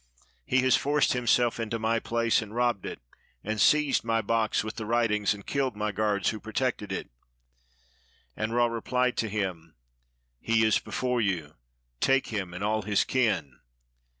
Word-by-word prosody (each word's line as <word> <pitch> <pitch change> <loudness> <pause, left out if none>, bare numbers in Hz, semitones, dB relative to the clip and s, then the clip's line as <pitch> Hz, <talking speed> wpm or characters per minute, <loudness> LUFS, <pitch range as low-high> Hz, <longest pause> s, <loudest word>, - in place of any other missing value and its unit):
He 130 - +3
has 130 - +5
forced 145 +1 +2
himself 120 -1 +2
into 115 0 -2
my 115 +1 0
place, 115 -1 +1
and 110 0 -9
robbed 120 -4 0
it, - - -6 0.4
and 110 0 -2
seized 150 -2 +4
my 115 -1 +1
box 110 0 +1
with 110 0 -6
the 110 -2 -5
writings, 110 -3 +1
and 100 - -13
killed 135 -4 -1
my 105 0 -2
guards 105 -1 0
who 110 - -6
protected 110 -1 -2
it." - - -5 1.2
And 110 +1 -2
Ra 120 0 +4
replied 125 +2 0
to 110 - 0
him, 90 -7 -4 0.6
"He 115 -1 +2
is 110 - +3
before 125 -2 -1
you, 85 -8 -1 0.5
take 135 - +2
him 100 -5 -3
and 90 +3 -6
all 110 +1 +1
his 105 0 +1
kin." 90 - 0
110 Hz, 165 wpm, -28 LUFS, 105-120 Hz, 1.2 s, has